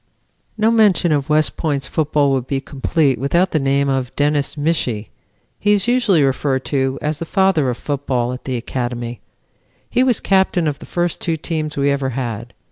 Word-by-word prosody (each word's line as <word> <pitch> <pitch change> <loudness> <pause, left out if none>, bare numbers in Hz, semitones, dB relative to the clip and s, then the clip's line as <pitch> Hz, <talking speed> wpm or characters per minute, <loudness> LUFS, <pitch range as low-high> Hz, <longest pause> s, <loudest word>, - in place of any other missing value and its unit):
"No 220 +1 +3
mention 205 -6 +4
of 145 -2 0
West 150 0 +2
Point's 145 -5 -1
football 145 -1 +1
would 130 -2 -1
be 135 - -1
complete 140 +1 0
without 170 +7 +1
the 155 - +1
name 140 0 +1
of 130 -2 -1
Dennis 145 0 0
Michie. 145 -8 -1 0.5
He 205 0 +3
is 205 +1 +1
usually 235 - +3
referred 135 0 0
to 135 -1 +1
as 150 0 -2
the - - -3
Father 190 -7 +2
of 120 - -2
Football 130 -4 -2
at 125 - -9
the 130 -2 -2
Academy. 120 -1 -4 0.7
He 250 - +2
was 250 -4 +2
captain 190 -3 +2
of 145 -2 -2
the - - -11
first 175 -1 -2
two 165 -2 -1
teams 155 -1 -3
we 140 0 +2
ever 140 -1 -1
had. 120 -2 -4
145 Hz, 185 wpm, -19 LUFS, 130-170 Hz, 0.7 s, mention